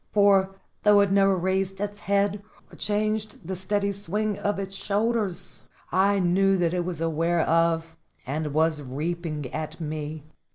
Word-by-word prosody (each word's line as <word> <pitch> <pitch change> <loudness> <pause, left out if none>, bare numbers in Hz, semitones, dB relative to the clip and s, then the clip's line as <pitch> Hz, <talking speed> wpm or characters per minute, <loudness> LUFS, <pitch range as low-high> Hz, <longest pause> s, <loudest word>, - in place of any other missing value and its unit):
For, 195 -2 +4 0.3
though 210 -1 +6
it 200 -1 +2
never 195 -1 +4
raised 190 +1 -1
its 205 0 -4
head, 200 0 +1 0.3
or - - -10
changed 215 -2 -2
the 190 - -2
steady 200 +2 -1
swing 205 +2 -2
of 205 -1 -1
its 195 0 -3
shoulders, 210 -2 -1 0.3
I 195 +3 +3
knew 195 +1 +3
that 170 -1 +1
it 180 -1 0
was 175 -3 -4
aware 165 +1 +1
of 165 0 +1 0.3
and 150 +3 -2
was 155 0 +1
reaping 155 +2 -4
at 155 +1 -5
me. 155 -1 -5
190 Hz, 155 wpm, -26 LUFS, 165-200 Hz, 0.3 s, though